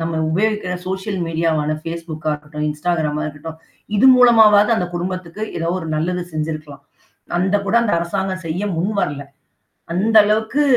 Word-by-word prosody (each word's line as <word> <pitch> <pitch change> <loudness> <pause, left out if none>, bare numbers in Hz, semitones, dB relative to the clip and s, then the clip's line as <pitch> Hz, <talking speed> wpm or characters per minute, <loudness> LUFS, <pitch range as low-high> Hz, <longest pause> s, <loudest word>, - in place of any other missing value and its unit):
நம்ம 165 0 -2 0.2
உபயோகிக்கிற 205 +1 0
சோசியல் 190 +1 -3
மீடியாவான 160 -2 0
Facebookகா 165 -2 -4
இருக்கட்டும், 150 0 -6
Instagramமா 150 -1 -1
இருக்கட்டும். 155 +2 -8 0.4
இது 260 - +5
மூலமாவது 220 -3 +6
அந்த 180 - -1
குடும்பத்துக்கு 185 +2 -5
ஏதாவது 170 +2 -1
ஒரு 160 - -6
நல்லது 180 +3 -1
செஞ்ச்சிருக்கலாம். 155 -2 -5 0.6
அந்த 190 +3 +2
கூட 195 - -1
அந்த 225 - 0
அரசாங்கம் 185 +2 -3
செய்ய 170 +5 -2
முன்வரல. 170 -5 -1 0.7
அந்த 220 +5 +1
அளவுக்கு 220 +7 +1
175 Hz, 135 wpm, -19 LUFS, 155-200 Hz, 0.7 s, மூலமாவது